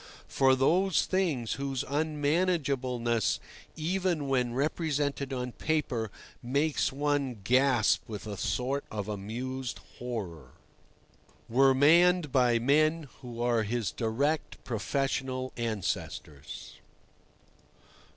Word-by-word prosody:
For 130 -1 +4
those 175 +7 +3
things, 160 - 0
whose 135 -2 -2
unmanageableness, 145 - 0 0.4
even 170 -2 -1
when 125 -3 +1
represented 145 -1 -1
on 125 -1 -3
paper, 130 -7 -1 0.3
makes 140 +5 +1
one 140 -4 -1
gasp 125 -1 +3
with 105 -1 -6
a 105 -1 -5
sort 125 +7 -1
of 105 -2 -4
amused 120 +5 -4 0.2
horror, 90 - -5 0.9
were 135 +3 +4
manned 170 +3 +5
by 125 -3 +4
men 155 +5 +2
who 120 -2 -5
are 120 -2 +2
his 110 0 -1
direct 135 +7 -1
professional 130 +2 -2
ancestors. 105 - -4
130 Hz, 95 wpm, -29 LUFS, 120-145 Hz, 0.9 s, manned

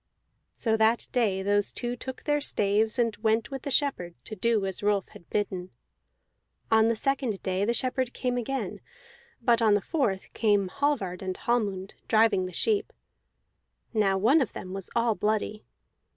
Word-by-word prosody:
So 225 -2 0
that 220 +2 +3
day 205 -6 +1
those 205 0 +1
two 240 0 -3
took 260 +2 -7
their 295 -1 +1
staves, 215 -1 +1
and 230 -3 +1
went 220 +2 +1
with 270 -1 -4
the 280 - -4
shepherd 250 - 0
to 215 - -7
do 215 0 +1
as 190 -1 -4
Rolf 205 -1 +1
had 170 - -16
bidden. 190 -3 -2 1.0
On 220 0 +5
the 230 - +2
second 255 -4 -1
day 190 +1 0
the 235 - +1
shepherd 255 -1 0
came 250 -1 -2
again; 265 +3 -3 0.6
but 235 -2 +3
on 215 -2 +5
the - - +3
fourth 210 - -2
came 205 -4 +2
Hallvard 220 -8 -1
and 185 -1 -4
Hallmund, 200 -5 -1
driving 215 -4 +3
the - - -8
sheep. 425 - 0 1.0
Now 200 -3 +2
one 260 +11 +4
of 250 - -2
them 185 - -7
was 195 -1 -6
all 235 -1 +3
bloody. 210 +1 -1
220 Hz, 165 wpm, -27 LUFS, 195-245 Hz, 1.0 s, On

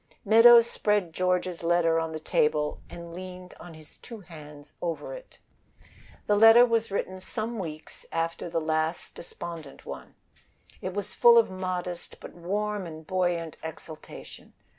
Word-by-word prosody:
Meadows 230 +2 +8
spread 205 -7 0
George's 180 0 -1
letter 165 -1 +2
on 165 0 -3
the 160 - -5
table 150 -1 0
and 170 -1 -9
leaned 180 0 -9
on 175 -2 -11
his 155 -1 -15
two 230 -4 -11
hands 150 -4 -13
over 170 - -4
it. - - -11 0.9
The 210 - +2
letter 225 +3 +8
was 230 -2 0
written 190 -1 -3
some 220 +4 -3
weeks 155 -4 -8
after 165 +1 -2
the 165 0 -1
last 160 +1 -2
desponding 165 -4 -9
one. - - -9 0.7
It 185 0 -5
was 205 -1 -4
full 235 0 +6
of 230 -4 +4
modest, 180 -2 -5
but - - -11
warm 200 +2 -3
and 160 -1 -10
buoyant 175 -2 -1
exultation. 160 -1 -10
180 Hz, 145 wpm, -27 LUFS, 165-205 Hz, 0.9 s, Meadows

